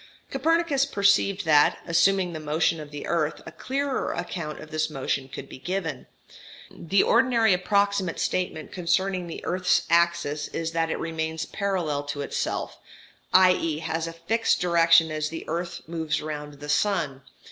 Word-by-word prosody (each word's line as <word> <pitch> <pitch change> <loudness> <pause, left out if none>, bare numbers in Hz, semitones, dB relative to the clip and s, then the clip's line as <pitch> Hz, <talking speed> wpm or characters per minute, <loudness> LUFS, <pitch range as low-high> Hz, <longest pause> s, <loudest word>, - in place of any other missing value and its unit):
Copernicus 310 0 +2
perceived 200 -4 +2
that, 150 -2 +5
assuming 180 +1 +2
the 160 - -5
motion 155 +2 0
of 150 -1 -8
the 145 0 -7
earth, 155 -3 0
a - - -8
clearer 275 0 -2
account 155 -4 -5
of 155 - -11
this 155 0 0
motion 135 -2 -2
could - - -8
be - - -11
given. 165 -3 -4 0.6
The 190 +4 +1
ordinary 230 -5 +4
approximate 200 0 +1
statement 180 -4 -2
concerning 180 +1 0
the 165 - -7
earth's 185 0 +2
axis 170 -4 +2
is 165 0 -4
that 165 0 0
it - - -1
remains 160 -1 -3
parallel 180 -8 -2
to 145 0 -4
itself, - - -3 0.5
i.e. 180 -4 +4
has 165 +1 -3
a 165 - -6
fixed 220 +8 0
direction 165 -2 +4
as 155 0 -2
the 165 - -7
earth 170 +2 -4
moves 160 -2 -2
round 150 -1 -6
the 145 +1 -10
sun. 150 -6 0
165 Hz, 155 wpm, -25 LUFS, 155-190 Hz, 0.6 s, that